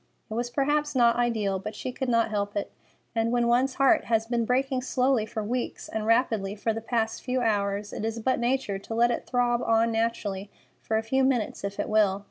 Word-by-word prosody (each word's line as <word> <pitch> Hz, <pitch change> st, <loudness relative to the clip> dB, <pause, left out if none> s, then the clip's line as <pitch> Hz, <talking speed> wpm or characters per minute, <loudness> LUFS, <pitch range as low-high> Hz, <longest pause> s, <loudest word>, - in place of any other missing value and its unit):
It -, -, -2 dB
was 240 Hz, +2 st, -2 dB
perhaps 295 Hz, +3 st, 0 dB
not 235 Hz, -2 st, +5 dB
ideal, 220 Hz, -5 st, 0 dB
but 215 Hz, +3 st, -6 dB
she 255 Hz, -, -4 dB
could 265 Hz, 0 st, -3 dB
not 230 Hz, -2 st, +2 dB
help 205 Hz, -1 st, -2 dB
it, 200 Hz, -, -3 dB, 0.4 s
and 225 Hz, 0 st, 0 dB
when 240 Hz, -1 st, +2 dB
one's 255 Hz, +2 st, +2 dB
heart 275 Hz, -1 st, +4 dB
has 225 Hz, -1 st, +1 dB
been 235 Hz, 0 st, 0 dB
breaking 260 Hz, +2 st, +1 dB
slowly 255 Hz, -3 st, +1 dB
for 220 Hz, 0 st, -4 dB
weeks 240 Hz, +3 st, -3 dB
and 220 Hz, 0 st, -3 dB
rapidly 225 Hz, -4 st, +2 dB
for 220 Hz, +2 st, -1 dB
the 225 Hz, 0 st, -5 dB
last 225 Hz, -1 st, 0 dB
few 255 Hz, 0 st, -1 dB
hours, 205 Hz, -2 st, 0 dB
it -, -, -5 dB
is 225 Hz, +1 st, -2 dB
but 260 Hz, +3 st, 0 dB
nature 240 Hz, -5 st, 0 dB
to 225 Hz, +3 st, -6 dB
let 240 Hz, +1 st, +4 dB
it -, -, -3 dB
throb 245 Hz, -1 st, +1 dB
on 230 Hz, 0 st, +2 dB
naturally 215 Hz, -3 st, -2 dB, 0.3 s
for 220 Hz, -, -1 dB
a 220 Hz, -, -1 dB
few 265 Hz, +4 st, +1 dB
minutes 250 Hz, -7 st, 0 dB
if 200 Hz, 0 st, -4 dB
it -, -, -1 dB
will. 210 Hz, -3 st, +3 dB
230 Hz, 220 wpm, -27 LUFS, 215-250 Hz, 0.4 s, not